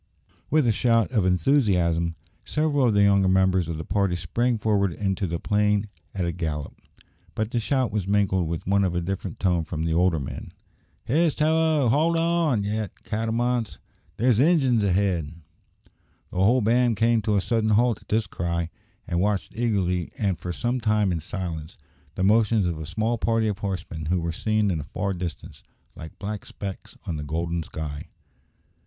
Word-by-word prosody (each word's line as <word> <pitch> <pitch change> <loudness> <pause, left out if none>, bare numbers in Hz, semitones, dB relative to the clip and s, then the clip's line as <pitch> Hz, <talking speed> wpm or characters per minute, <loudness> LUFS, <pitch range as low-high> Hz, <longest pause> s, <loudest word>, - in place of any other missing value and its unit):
With 155 -3 +3
a 115 - +4
shout 115 +1 +2
of 105 -7 +2
enthusiasm, 90 - +2 0.3
several 150 -4 +1
of 110 - +2
the 100 - +5
younger 100 -1 +4
members 95 -2 +3
of 80 - -3
the 80 - -5
party 100 -2 0
sprang 115 +9 0
forward 105 -3 +1
into 95 +1 -1
the 85 0 -3
plain 105 0 +1 0.3
at 95 -2 -1
a 85 - -1
gallop; 80 -4 -4 0.6
but 110 +1 -2
the 120 - 0
shout 130 -1 0
was 100 -3 -2
mingled 95 -3 +2
with 80 0 -4
one 100 +1 +2
of 90 -2 0
a 90 - 0
different 95 0 -4
tone 90 -3 +1
from 80 0 -4
the 80 0 0
older 85 -1 +2
men. 65 - -7 0.5
"Hist! 160 +4 +2
hallo! 155 -2 +3
hold 160 +8 +3
on, 165 -9 +1
ye 105 +1 -1 0.2
catamounts! 115 +2 -1 0.4
There's 120 -1 +3
Injuns 135 -6 +4
ahead!" 95 -6 +1 1.0
The - - -7
whole 120 +6 +4
band 120 +1 +2
came 115 0 +3
to 105 0 0
a 100 - +3
sudden 110 +1 0
halt 115 +1 +3
at - - -23
this 110 0 +1
cry, 85 -3 -3 0.4
and 85 -5 -1
watched 100 -1 -1
eagerly, 95 -7 0
and 95 -6 -1
for 90 +2 -4
some 120 +8 -1
time 105 -3 +2
in 85 - -1
silence, 85 -1 -6 0.4
the 95 - -1
motions 105 0 +3
of 85 -3 -2
a 80 - -6
small 110 +6 -1
party 115 -1 +1
of 105 -2 -2
horsemen 90 -6 -4
who 90 +2 +1
were 85 0 -2
seen 105 +4 0
in 80 - -1
the - - -4
far 100 +6 -3
distance, 85 -3 -6 0.3
like 80 - -10
black 105 0 -5
specks 100 -2 -8
on 80 - -3
the 75 - -5
golden 85 +3 -2
sky. 75 -2 -6
100 Hz, 180 wpm, -25 LUFS, 85-115 Hz, 1.0 s, the